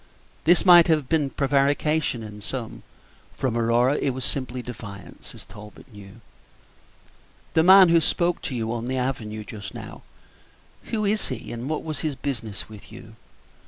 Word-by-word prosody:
This 175 +4 +4
might 175 -2 +8
have 155 -5 +1
been 150 -3 +1
prevarication 140 -1 0
in 105 -1 -10
some; 115 +1 -6 0.5
from 125 -3 -2
Aurora 120 +4 +2
it 135 -3 -1
was 130 - -3
simply 130 -2 -4
defiance, 100 -6 -10
as - - -12
Talbot 105 +4 -14
knew. 105 +2 -13 1.3
"The 160 - +4
man 190 +1 +8
who 165 0 +5
spoke 175 +1 0
to 130 - -5
you 115 -1 -2
on 120 0 -4
the 130 +1 -2
avenue 110 -5 -3
just 100 -2 -9
now. - - -9 0.8
Who 215 -2 -2
is 210 +1 +1
he, - - -6
and 120 +4 -5
what 155 - -2
was 155 -2 -5
his 155 -3 -2
business 120 -8 -5
with 105 -2 -14
you?" - - -12
130 Hz, 160 wpm, -24 LUFS, 115-155 Hz, 1.3 s, might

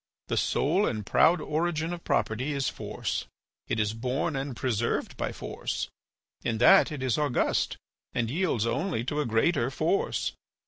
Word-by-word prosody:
The - - +1
sole 180 +8 +2
and 105 -3 -2
proud 175 - +4
origin 160 +1 -1
of 175 - -7
property 130 +7 0
is 140 -2 0
force. - - -4 0.4
It 110 - -1
is 105 0 +1
born 130 +6 -1
and 135 -1 -3
preserved 120 -3 -1
by - - -2
force. - - -4 0.5
In 115 - 0
that 170 - +6
it 145 -4 -4
is 130 +1 +1
august 145 -5 +1 0.3
and 115 - 0
yields 155 - +1
only 155 +2 -1
to 145 +4 -1
a 145 - -2
greater 115 +3 +2
force. 160 +8 0
135 Hz, 155 wpm, -28 LUFS, 115-160 Hz, 0.5 s, that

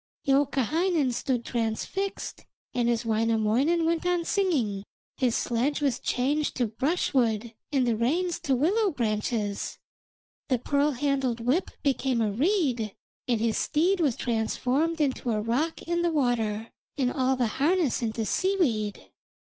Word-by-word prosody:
Youkahainen 285 - +2
stood 245 0 -1
transfixed, 240 - -3 0.3
and 240 -1 +1
as 235 0 0
Wainamoinen 230 +8 +2
went 330 0 +1
on 355 -1 0
singing 270 - 0 0.3
his 250 -3 +1
sledge 250 +5 0
was 275 -5 0
changed 290 +4 0
to 250 - +1
brushwood 235 - 0 0.2
and 270 -3 +2
the 235 -2 +2
reins 335 +10 0
to 270 - +1
willow 390 - +2
branches, 215 - -2 0.7
the 255 - +2
pearl 285 +4 +1
handled 265 -2 0
whip 260 +10 +1
became 265 -3 +1
a 215 -2 +1
reed, 255 - 0 0.3
and 240 -3 +1
his 225 0 +1
steed 360 +6 +2
was 285 -8 +2
transformed 255 +7 0
into 265 -4 0
a 215 -2 +1
rock 250 +10 -1
in 345 0 -1
the 345 -1 +1
water, 230 -6 0 0.3
and 255 -3 +1
all 265 0 +1
the 250 -1 +1
harness 295 +4 +1
into 225 -1 -2
seaweed. 250 - 0
260 Hz, 140 wpm, -27 LUFS, 230-315 Hz, 0.7 s, Youkahainen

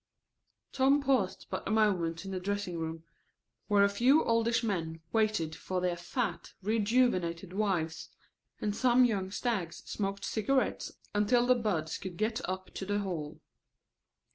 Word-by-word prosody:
Tom 275 +2 +4
paused 260 -9 +1
but - - -3
a - - -2
moment 190 -6 +1
in 195 - -5
the 185 - -2
dressing 200 -2 -3
room, 160 0 -4 0.6
where 205 -1 +5
a - - +6
few 250 +9 +4
oldish 230 +1 +2
men 165 -7 -2
waited 215 -8 +1
for 185 +3 -3
their 180 -1 0
fat, 220 +8 -3
rejuvenated 200 -5 +1
wives, 185 -6 -1 0.5
and 205 -1 -1
some 250 +1 +5
young 200 -5 0
stags 195 -5 -2
smoked 195 -1 -3
cigarettes 240 +3 0 0.2
until 240 +4 +3
the 255 - +6
buds 195 -10 -1
could 180 -3 -7
get 220 +5 0
up 185 0 -5
to - - -5
the 205 +1 -1
hall. 165 -7 -5
200 Hz, 145 wpm, -31 LUFS, 180-230 Hz, 0.6 s, a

